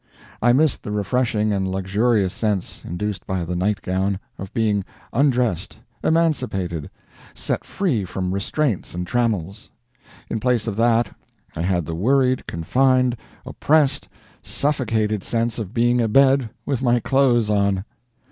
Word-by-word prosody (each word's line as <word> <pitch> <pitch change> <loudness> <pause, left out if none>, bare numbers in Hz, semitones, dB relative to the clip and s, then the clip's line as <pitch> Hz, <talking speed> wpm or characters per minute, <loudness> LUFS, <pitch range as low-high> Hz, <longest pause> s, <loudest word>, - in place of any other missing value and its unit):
I 120 - +5
missed 145 +3 +2
the 105 - -6
refreshing 105 0 0
and 95 -1 -1
luxurious 95 +1 +1
sense, 105 -5 -2
induced 100 +4 -4
by 95 -2 -2
the 90 +1 -3
night 100 +3 0
gown, 95 +1 -1 0.2
of 95 0 -7
being 105 -3 +1 0.3
undressed, 125 - +1 0.3
emancipated, 125 - 0 0.5
set - - -2
free 155 - -1
from 90 +1 -3
restraints 100 - -1
and 90 0 -3
trammels. 105 -2 -1 0.6
In 110 - -2
place 125 -1 +1
of 110 -4 -3
that, 115 -1 +2 0.4
I - - -3
had 90 -2 0
the 85 - -4
worried, 130 +8 +2
confined, 125 +8 +2 0.3
oppressed, 145 -2 +1 0.3
suffocated 110 -8 0
sense 115 0 -1
of 105 -4 -5
being 120 +1 +2
abed 130 +2 +4 0.2
with 135 -4 -1
my 120 -2 +3
clothes 120 -4 +2
on. 100 -1 +1
110 Hz, 135 wpm, -22 LUFS, 95-125 Hz, 0.6 s, I